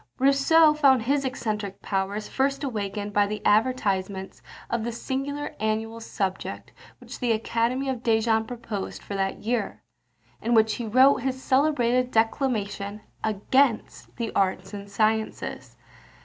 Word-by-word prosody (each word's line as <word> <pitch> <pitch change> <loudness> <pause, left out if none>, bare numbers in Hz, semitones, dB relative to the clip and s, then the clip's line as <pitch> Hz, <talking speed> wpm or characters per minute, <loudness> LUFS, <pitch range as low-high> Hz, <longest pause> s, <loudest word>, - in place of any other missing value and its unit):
Rousseau 280 +4 +5
found 270 -5 +4
his 275 +3 +1
eccentric 215 -6 -3
powers 200 +2 -2
first 275 +1 0
awakened 205 -5 -3
by 205 0 +3
the 210 +1 -4
advertisement 200 -4 +1 0.3
of 235 -2 -2
the 235 - -2
singular 275 +5 -4
annual 220 +1 -2
subject 195 -4 -4 0.3
which - - -10
the 245 -2 +1
Academy 235 +4 0
of 260 -3 -2
Dijon 225 -1 +2
proposed 225 -5 -6
for - - -7
that 195 -1 -2
year, 225 -1 -2 0.6
in 235 +2 +1
which 220 -1 +4
he 235 - -4
wrote 260 +5 +6
his 260 +1 -2
celebrated 255 -3 +2
declamation 220 -4 -1 0.2
against 225 +4 0
the 230 -2 -3
arts 190 0 0
and 200 0 -7
sciences. 220 +2 -1
225 Hz, 135 wpm, -25 LUFS, 205-260 Hz, 0.6 s, wrote